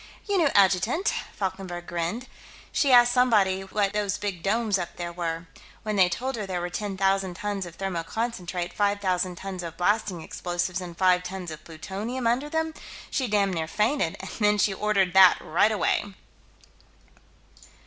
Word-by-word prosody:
"Your 400 Hz, -2 st, +2 dB
new 325 Hz, -, +4 dB
adjutant," 200 Hz, -, +3 dB, 0.2 s
Falkenberg 185 Hz, -3 st, -4 dB
grinned. 175 Hz, +10 st, -3 dB, 0.4 s
"She 280 Hz, -, +2 dB
asked 245 Hz, -1 st, +7 dB
somebody 215 Hz, -7 st, +3 dB
what 195 Hz, +1 st, -1 dB
those 205 Hz, -2 st, 0 dB
big 195 Hz, -5 st, -4 dB
domes, 210 Hz, +1 st, +1 dB
up 175 Hz, -, -5 dB
there, 175 Hz, -1 st, -5 dB
were. 165 Hz, -1 st, -3 dB, 0.4 s
When 215 Hz, -1 st, -2 dB
they 185 Hz, -3 st, +5 dB
told 260 Hz, +7 st, -3 dB
her 210 Hz, -3 st, -4 dB
there 185 Hz, -2 st, -2 dB
were 175 Hz, 0 st, -4 dB
ten 200 Hz, 0 st, -4 dB
thousand 195 Hz, -1 st, +1 dB
tons 200 Hz, -1 st, -3 dB
of 170 Hz, -, -12 dB
thermoconcentrate, 180 Hz, -1 st, -3 dB
five 205 Hz, 0 st, +1 dB
thousand 185 Hz, -2 st, 0 dB
tons 190 Hz, 0 st, -6 dB
of 165 Hz, -1 st, -7 dB
blasting 195 Hz, -1 st, 0 dB
explosives, 175 Hz, +2 st, -3 dB
and 175 Hz, -2 st, -8 dB
five 185 Hz, -1 st, +4 dB
tons 180 Hz, -1 st, -6 dB
of 155 Hz, -, -9 dB
plutonium, 200 Hz, +10 st, -5 dB
under 250 Hz, +6 st, +1 dB
them, 320 Hz, 0 st, -1 dB, 0.4 s
she 260 Hz, -, 0 dB
damned 200 Hz, -3 st, +2 dB
near 160 Hz, -2 st, -2 dB
fainted, 210 Hz, -, 0 dB
and 190 Hz, -, -7 dB
then 210 Hz, -1 st, +3 dB
she 200 Hz, 0 st, +2 dB
ordered 195 Hz, -3 st, +1 dB
that, 190 Hz, -2 st, +8 dB
right 185 Hz, +7 st, +2 dB
away." 215 Hz, -, +1 dB
195 Hz, 170 wpm, -26 LUFS, 180-215 Hz, 0.4 s, that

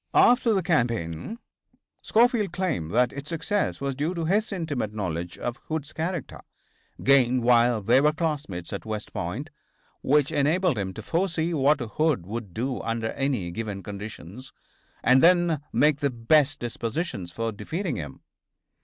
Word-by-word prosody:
After 240 Hz, -2 st, +5 dB
the 190 Hz, -, +1 dB
campaign 115 Hz, -, -1 dB, 0.6 s
Schofield 230 Hz, -4 st, +3 dB
claimed 175 Hz, -, -2 dB
that 125 Hz, +5 st, +2 dB
its 140 Hz, +1 st, -7 dB
success 175 Hz, +5 st, -1 dB
was 140 Hz, 0 st, -2 dB
due 150 Hz, +7 st, -2 dB
to 165 Hz, -1 st, -2 dB
his 210 Hz, +6 st, +1 dB
intimate 145 Hz, -, -3 dB
knowledge 90 Hz, -4 st, -3 dB
of 120 Hz, +1 st, -4 dB
Hood's 155 Hz, -2 st, -4 dB
character, 165 Hz, -2 st, -4 dB, 0.6 s
gained 130 Hz, -2 st, +4 dB
while 120 Hz, -2 st, +4 dB
they 130 Hz, -, +5 dB
were 150 Hz, +1 st, +4 dB
classmates 150 Hz, -, -3 dB
at -, -, -4 dB
West 110 Hz, -1 st, -5 dB
Point, -, -, -4 dB, 0.5 s
which 145 Hz, +1 st, +3 dB
enabled 155 Hz, -, +2 dB
him 95 Hz, -1 st, -2 dB
to -, -, -7 dB
foresee 170 Hz, -1 st, 0 dB
what 145 Hz, 0 st, +3 dB
Hood 125 Hz, -, 0 dB
would 105 Hz, 0 st, -6 dB
do 125 Hz, +6 st, -3 dB
under 115 Hz, -1 st, -2 dB
any 130 Hz, -11 st, -1 dB
given 100 Hz, -1 st, -5 dB
conditions, 105 Hz, +3 st, -8 dB, 0.5 s
and 130 Hz, +1 st, +5 dB
then 175 Hz, -3 st, +4 dB
make 150 Hz, -1 st, +3 dB
the 145 Hz, -1 st, +1 dB
best 140 Hz, +4 st, +2 dB
dispositions 115 Hz, -, -4 dB
for 115 Hz, +5 st, -2 dB
defeating 155 Hz, -, -3 dB
him. 75 Hz, -5 st, -7 dB
135 Hz, 150 wpm, -26 LUFS, 110-165 Hz, 0.6 s, After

